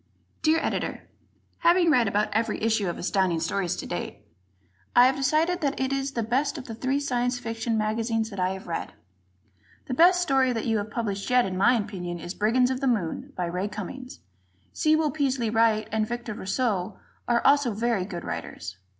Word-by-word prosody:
_ -, -, -40 dB
Dear 320 Hz, +1 st, +3 dB
Editor: -, -, -2 dB, 0.6 s
Having 345 Hz, 0 st, +4 dB
read 245 Hz, -6 st, +4 dB
about 205 Hz, +1 st, +1 dB
every 220 Hz, 0 st, 0 dB
issue 220 Hz, -4 st, +1 dB
of 170 Hz, -, -4 dB
Astounding 185 Hz, -2 st, +1 dB
Stories 180 Hz, +1 st, -1 dB
to -, -, -6 dB
date, -, -, -6 dB, 0.7 s
I 245 Hz, -, +8 dB
have 265 Hz, +1 st, +3 dB
decided 310 Hz, +6 st, +1 dB
that 280 Hz, -2 st, -1 dB
it 265 Hz, +1 st, 0 dB
is 275 Hz, 0 st, -2 dB
the 230 Hz, -, -1 dB
best 265 Hz, +8 st, 0 dB
of 265 Hz, -, -7 dB
the 230 Hz, -, -7 dB
three 260 Hz, +5 st, -1 dB
Science 245 Hz, -3 st, 0 dB
Fiction 225 Hz, -1 st, -2 dB
magazines 220 Hz, +1 st, -1 dB
that 195 Hz, -, -7 dB
I 185 Hz, 0 st, +2 dB
have 190 Hz, -, -9 dB
read. 170 Hz, -, -4 dB, 0.9 s
The 255 Hz, -, -4 dB
best 355 Hz, +6 st, +6 dB
story 270 Hz, -7 st, +2 dB
that 225 Hz, -, -3 dB
you 225 Hz, -2 st, +1 dB
have 205 Hz, +1 st, -5 dB
published 205 Hz, -3 st, -3 dB
yet, 250 Hz, -1 st, +4 dB
in 190 Hz, -1 st, -3 dB
my 220 Hz, +7 st, +4 dB
opinion, 190 Hz, -6 st, -3 dB
is 175 Hz, +2 st, -6 dB
"Brigands 250 Hz, +5 st, +2 dB
of 260 Hz, +1 st, -3 dB
the 270 Hz, -, +1 dB
Moon," 240 Hz, -, -1 dB
by 180 Hz, -, -1 dB
Ray 180 Hz, +3 st, -2 dB
Cummings. 215 Hz, +6 st, -8 dB, 0.5 s
Sewell 310 Hz, -1 st, +2 dB
Peaslee 260 Hz, -6 st, 0 dB
Wright 225 Hz, -1 st, +2 dB
and 215 Hz, 0 st, 0 dB
Victor 240 Hz, -1 st, -4 dB
Rousseau 200 Hz, -2 st, -2 dB, 0.3 s
are 240 Hz, 0 st, +1 dB
also 280 Hz, -3 st, +4 dB
very 225 Hz, -2 st, 0 dB
good 180 Hz, -3 st, -6 dB
writers. 90 Hz, -, -6 dB
230 Hz, 195 wpm, -26 LUFS, 205-265 Hz, 0.9 s, I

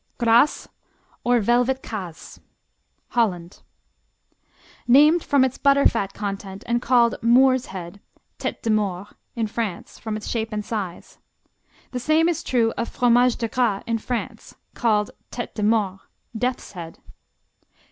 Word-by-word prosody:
Gras, 235 Hz, +4 st, +3 dB, 0.6 s
or 245 Hz, 0 st, +3 dB
Velvet 245 Hz, +4 st, +1 dB
Kaas 185 Hz, -7 st, -8 dB, 0.7 s
Holland 185 Hz, -7 st, -1 dB, 1.3 s
Named 300 Hz, +7 st, +6 dB
from 280 Hz, -2 st, +3 dB
its 260 Hz, -, -4 dB
butterfat 275 Hz, -8 st, +3 dB
content 195 Hz, -1 st, -6 dB
and 240 Hz, 0 st, 0 dB
called 240 Hz, -2 st, +3 dB
"Moors 255 Hz, +2 st, +4 dB
Head", 185 Hz, 0 st, -8 dB, 0.4 s
Tête -, -, -4 dB
de 225 Hz, -, +1 dB
Maure, 200 Hz, -2 st, -1 dB, 0.3 s
in 230 Hz, -2 st, 0 dB
France, 215 Hz, -4 st, -5 dB
from 215 Hz, -1 st, -4 dB
its 215 Hz, -, -8 dB
shape 225 Hz, -1 st, -2 dB
and 210 Hz, -1 st, -3 dB
size. 200 Hz, -6 st, -6 dB, 0.7 s
The 250 Hz, -, -3 dB
same 310 Hz, +5 st, +3 dB
is 335 Hz, -2 st, 0 dB
true 230 Hz, -6 st, +1 dB
of 235 Hz, -, -2 dB
Fromage 245 Hz, 0 st, +3 dB
de 230 Hz, -, -2 dB
Gras 230 Hz, -5 st, 0 dB
in 230 Hz, -1 st, -1 dB
France, 240 Hz, +2 st, -5 dB, 0.2 s
called 210 Hz, -3 st, +1 dB, 0.2 s
Tête 240 Hz, -, -5 dB
de 220 Hz, -, -5 dB
Mort, 205 Hz, -3 st, +1 dB, 0.4 s
"Death's 250 Hz, +3 st, -2 dB
Head". 170 Hz, -3 st, -9 dB
230 Hz, 135 wpm, -23 LUFS, 205-250 Hz, 1.3 s, Named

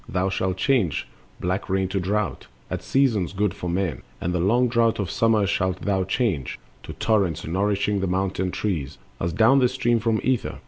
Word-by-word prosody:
Thou 90 Hz, +2 st, 0 dB
shalt 95 Hz, -1 st, -1 dB
change 115 Hz, -, +1 dB, 0.3 s
Black 90 Hz, +3 st, -2 dB
rain 95 Hz, 0 st, +1 dB
to 95 Hz, +1 st, -1 dB
drought, 100 Hz, +2 st, -2 dB, 0.2 s
at -, -, -2 dB
seasons 115 Hz, -10 st, +1 dB
good 100 Hz, -1 st, 0 dB
for 90 Hz, -, -5 dB
men, 90 Hz, -2 st, -1 dB, 0.2 s
And 90 Hz, -, -2 dB
the 90 Hz, -, 0 dB
long 120 Hz, +8 st, +3 dB
drought 115 Hz, -1 st, +2 dB
of 100 Hz, -5 st, -2 dB
summer 110 Hz, -2 st, +3 dB
shalt 95 Hz, -2 st, -1 dB
thou 95 Hz, -2 st, +1 dB
change 95 Hz, -, -1 dB, 0.2 s
To -, -, -8 dB
torrents, 95 Hz, -7 st, 0 dB
nourishing 100 Hz, +3 st, 0 dB
the 95 Hz, -, -1 dB
mountain 95 Hz, 0 st, -1 dB
trees, 85 Hz, -8 st, -3 dB, 0.2 s
As 85 Hz, -, -1 dB
down 115 Hz, -, +5 dB
they 125 Hz, -, +4 dB
stream 120 Hz, -2 st, +1 dB
from 110 Hz, -1 st, +1 dB
ether. 130 Hz, -1 st, 0 dB
95 Hz, 185 wpm, -24 LUFS, 90-110 Hz, 0.3 s, down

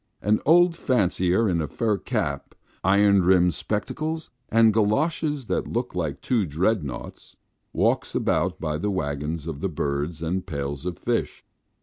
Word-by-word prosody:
An 105 Hz, +2 st, +3 dB
old 175 Hz, +2 st, +5 dB
fancier 100 Hz, -, +1 dB
in 85 Hz, -4 st, +1 dB
a 75 Hz, -, -2 dB
fur 110 Hz, -, 0 dB
cap, -, -, -3 dB, 0.3 s
iron 100 Hz, +1 st, +4 dB
rimmed 90 Hz, -1 st, +4 dB
spectacles, 155 Hz, -, -3 dB, 0.2 s
and 115 Hz, -1 st, +5 dB
goloshes 145 Hz, +7 st, +1 dB
that -, -, -1 dB
look 120 Hz, +2 st, -3 dB
like 80 Hz, -6 st, -3 dB
two 120 Hz, -5 st, +1 dB
dread 90 Hz, +5 st, 0 dB
noughts, 70 Hz, -3 st, -8 dB, 0.4 s
walks -, -, 0 dB
about -, -, 0 dB
by 75 Hz, -1 st, -2 dB
the 105 Hz, -, -1 dB
waggons 75 Hz, -3 st, -3 dB
of 80 Hz, -4 st, -5 dB, 0.2 s
birds 75 Hz, +4 st, -2 dB
and 90 Hz, +4 st, -2 dB
pails 70 Hz, -1 st, -4 dB
of 90 Hz, -3 st, -4 dB
fish. -, -, -2 dB
95 Hz, 145 wpm, -25 LUFS, 80-115 Hz, 0.4 s, old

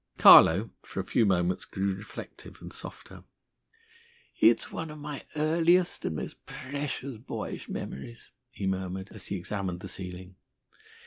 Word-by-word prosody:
Carlo, 95 Hz, +7 st, +8 dB
for -, -, -7 dB
a -, -, 0 dB
few 110 Hz, -, +2 dB
moments, 90 Hz, -1 st, +1 dB
grew 95 Hz, 0 st, -1 dB
reflective 100 Hz, +2 st, -10 dB
and -, -, -9 dB
softer. -, -, -10 dB, 1.2 s
"It's -, -, +4 dB
one 165 Hz, -1 st, -4 dB
of 150 Hz, -, -8 dB
my 150 Hz, -1 st, -7 dB
earliest 170 Hz, +3 st, +3 dB
and 80 Hz, -, -1 dB
most -, -, -6 dB
precious 140 Hz, -2 st, -4 dB
boyish 120 Hz, -, -6 dB
memories," 115 Hz, -, -7 dB, 0.2 s
he 100 Hz, -, -6 dB
murmured, 95 Hz, 0 st, -2 dB
as 105 Hz, -4 st, -8 dB
he 100 Hz, -, -2 dB
examined 95 Hz, -1 st, -3 dB
the 95 Hz, -, -6 dB
ceiling. 90 Hz, 0 st, -7 dB
100 Hz, 140 wpm, -29 LUFS, 95-140 Hz, 1.2 s, Carlo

